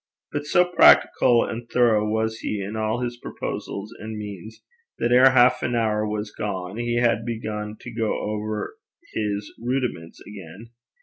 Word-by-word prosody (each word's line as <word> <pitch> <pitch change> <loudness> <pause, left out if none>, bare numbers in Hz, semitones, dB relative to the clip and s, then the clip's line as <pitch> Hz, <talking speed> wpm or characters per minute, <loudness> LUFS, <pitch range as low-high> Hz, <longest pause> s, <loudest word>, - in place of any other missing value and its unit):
But 145 0 -4
so 175 +4 +4
practical 130 -8 +5
and 115 0 -6
thorough 110 -4 +3
was 110 +1 -1
he 105 - -3
in 100 +2 -5
all 110 +2 -1
his 120 -1 -3
proposals 105 -2 -6
and 110 0 -6
means, 105 +1 -9 0.3
that 120 - 0
ere 130 +2 +7
half 125 -1 +4
an 120 - -1
hour 110 -2 +1
was 105 0 -4
gone, 95 -2 -4
he 120 0 -1
had 115 -2 +2
begun 110 -2 -5
to 120 - -8
go 115 -1 -1
over 105 - -4 0.4
his 105 -1 -3
Rudiments 120 -9 -3
again. 105 +3 -11
110 Hz, 160 wpm, -24 LUFS, 105-120 Hz, 0.4 s, ere